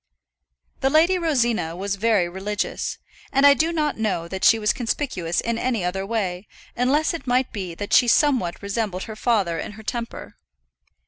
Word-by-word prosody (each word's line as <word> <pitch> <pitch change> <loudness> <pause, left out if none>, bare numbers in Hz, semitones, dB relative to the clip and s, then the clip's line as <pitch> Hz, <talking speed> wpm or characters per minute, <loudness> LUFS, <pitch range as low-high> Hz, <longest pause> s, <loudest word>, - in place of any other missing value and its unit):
The 270 - +2
Lady 335 +5 +4
Rosina 240 - 0
was 195 +2 -2
very 205 -3 +2
religious; 195 +4 -3 0.3
and 275 0 +3
I 285 - +9
do 320 +4 +1
not 305 -6 -1
know 190 -6 -1
that 190 +2 -6
she 225 - +6
was 210 -1 +1
conspicuous 225 - -2
in 230 0 -1
any 235 -6 -1
other 190 +2 -2
way, 195 -4 -2 0.3
unless 285 +7 +2
it 330 -5 -7
might 250 +1 +1
be 185 -5 -5
that 205 +3 -5
she 245 - +6
somewhat 245 - +2
resembled 200 -2 -2
her 220 - -7
father 200 -8 0
in - - -6
her 220 +1 -12
temper. 235 +1 -6
220 Hz, 175 wpm, -23 LUFS, 190-260 Hz, 0.3 s, I